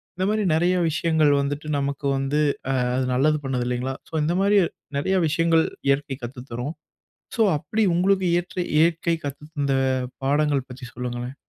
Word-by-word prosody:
இந்த 185 +1 -1
மாரி 215 0 +1
நெறைய 175 +3 +2
விஷயங்கள் 160 -1 +2
வந்துட்டு, 145 +2 -3
நமக்கு 140 0 -3
வந்து 135 +2 0 0.4
அ - - +1
அது 130 - +1
நல்லது 150 +4 +3
பண்ணுது 125 -2 -1
இல்லிங்களா? 125 +2 -2 0.2
ஸோ, - - -11
இந்த 170 - 0
மாரி 205 +1 +4 0.4
நெறையா 190 +7 +1
விஷயங்கள் 165 +1 +3 0.2
இயற்கை 140 0 +1
கத்து 125 +1 -7
தரும். 125 +7 -4 0.6
சோ 230 - 0 0.2
அப்டி 220 +9 -1
உங்களுக்கு 190 +2 +2
ஏற்ற 175 +1 -10 0.2
இயற்கை 165 +1 +2
கத்துத்தந்த 145 0 -3 0.5
பாடங்கள் 145 -1 +1
பற்றி 125 0 -9
சொல்லுங்களேன். 125 +1 -5
145 Hz, 150 wpm, -24 LUFS, 135-170 Hz, 0.6 s, மாரி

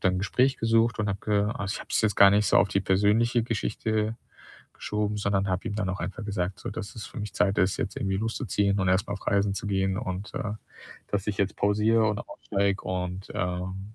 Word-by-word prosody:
dann 95 -1 +2
'n - - -1
Gespräch 130 +6 +2
gesucht 115 0 +2
und 105 - 0
habe 95 0 -2
ge 105 -1 +2
also, 100 0 -3
ich - - -4
habe - - -11
es - - +3
jetzt 105 -3 +2
gar 100 0 +8
nicht 105 +1 +3
so - - +4
auf - - +4
die 100 - +1
persönliche 105 +5 +3
Geschichte 110 -1 -1 0.6
geschoben, 105 0 -2
sondern 100 -1 0
habe 95 0 -1
ihm 100 - -4
dann 105 -3 -1
auch 95 - -4
einfach 105 +2 -5
gesagt, 95 -2 -3
so, - - -5
dass 100 - -6
es 110 - -6
für - - -9
mich 105 - -6
Zeit 100 0 +2
ist, 95 +2 +2
jetzt 95 - -3
irgendwie 95 -1 -1
loszuziehen 105 -3 0
und 95 - +1
erst 95 +1 +2
mal 100 - -2
auf 100 - -11
Reisen 100 0 +2
zu - - -5
gehen, 95 -1 0
und, 95 +1 -5
äh, 105 - -2 0.6
dass 100 0 -2
ich 105 - -1
jetzt 100 -1 0
pausiere 110 +2 +3
und 105 -1 -1
aussteige 100 -1 -1
und, 90 +1 -4
ähm, 95 +3 -3
100 Hz, 230 wpm, -27 LUFS, 95-105 Hz, 0.6 s, gar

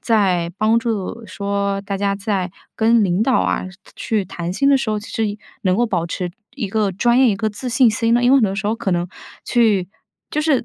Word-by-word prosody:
在 185 -7 +1
帮 215 +3 +3
助 230 -1 -3
说 200 0 -2
大 200 0 -4
家 200 0 0
在 195 -3 -2 0.2
跟 230 0 +4
领 185 -1 +1
导 260 +4 +2
啊， - - -1
是 185 - -14 0.2
去 215 -3 -1
谈 175 -1 -5
薪 275 +9 +2
的 280 - +6
时 250 - -3
候， 215 -1 0
其 205 - -11
实 225 - -1
也 205 0 -4 0.3
能 185 -1 +2
够 240 +2 +2
保 175 -6 -1
持 175 +1 -4 0.2
一 245 -7 -3
个 205 -1 0
专 235 +6 +2
业、 260 -1 +6
一 - - +1
个 215 +2 -1
自 215 +5 -6
信 250 -1 +4
心 230 +1 +1
呢？ 240 - +3
因 245 - +4
为 275 - +7
很 260 - +4
多 195 -2 -1
时 210 +2 -4
候 220 +2 0
可 195 - -1
能 175 0 -1 0.4
去 215 -7 +2 0.4
就 305 - 0
是 300 -6 +2
210 Hz, 260 characters per minute, -20 LUFS, 195-230 Hz, 0.4 s, 为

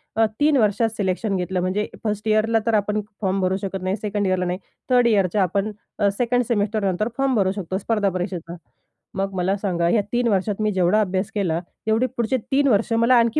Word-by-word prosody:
अ, 225 - +4
3 295 -1 +4
वर्षात 220 0 +2
सिलेक्शन 195 +1 -1
घेतलं. 185 0 -1
म्हणजे 190 +4 -1 0.2
फर्स्ट 210 -1 -2
इयरला 220 +1 +3
तर 230 - +1
आपण 210 0 +1 0.2
फॉर्म 195 -1 0
भरू 185 0 +1
शकत 195 -1 -4
नाही, 185 +1 0
सेकंड 205 -2 -2
इयरला 185 -1 +1
नाही, 180 +1 -2 0.3
थर्ड 245 -1 +4
इयरच्या 200 -3 +2
अ, - - +5
आपण 200 +4 -1 0.5
सेकंड 245 0 +2
सेमेस्टर 215 -1 0
नंतर 195 +3 0
फॉर्म 270 -1 +1
भरू 195 -3 +2
शकतो 190 -2 -3
स्पर्धा 210 0 0
परीक्षेचा. 180 -2 -4 0.6
मग 195 0 -2
मला 185 +2 +1
सांगा, 175 -4 0
या 210 +4 +3
3 240 0 +1
वर्षात 205 0 0
मी 215 0 +1
जेवढा 190 +3 +3
अभ्यास 190 0 -1
केला 175 -6 0 0.3
तेवढे 220 +3 +2
पुढचे 235 +2 +1
3 280 +1 +3
वर्ष 225 -1 +2
मला 230 +2 +4
आणखी 235 +4 +3
205 Hz, 200 wpm, -22 LUFS, 190-225 Hz, 0.6 s, अ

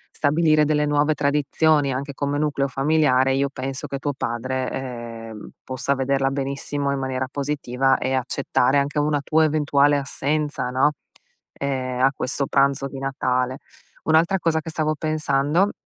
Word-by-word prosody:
stabilire 155 +1 +3
delle 150 0 +2
nuove 145 +1 +2
tradizioni, 145 +1 +2
anche 140 +2 -4
come 140 +1 -2
nucleo 145 -2 0
familiare, 135 -1 +2
io 140 +1 +1
penso 135 0 -5
che 140 - -4
tuo 145 +1 -2
padre, 130 +1 -3
ehm, 115 -4 -7
possa 130 +1 -2
vederla 135 0 0
benissimo 140 +1 -2
in 140 - -1
maniera 130 -1 -2
positiva, 135 -2 0
e 130 - -2
accettare 130 +1 +1
anche 140 +2 0
una 150 0 +1
tua 160 +3 +2
eventuale 145 -2 +3
assenza, 145 -1 -2
no, 130 +4 +3 0.6
ehm, 130 -2 -3
a 135 +1 +5
questo 135 +2 -1
pranzo 140 0 +2
di 135 - -9
Natale. 130 -1 -1 0.5
Un'altra 165 +4 +3
cosa 160 -2 +1
che 165 - -7
stavo 155 -1 -1
pensando, 155 +4 +1
140 Hz, 150 wpm, -23 LUFS, 130-150 Hz, 0.6 s, a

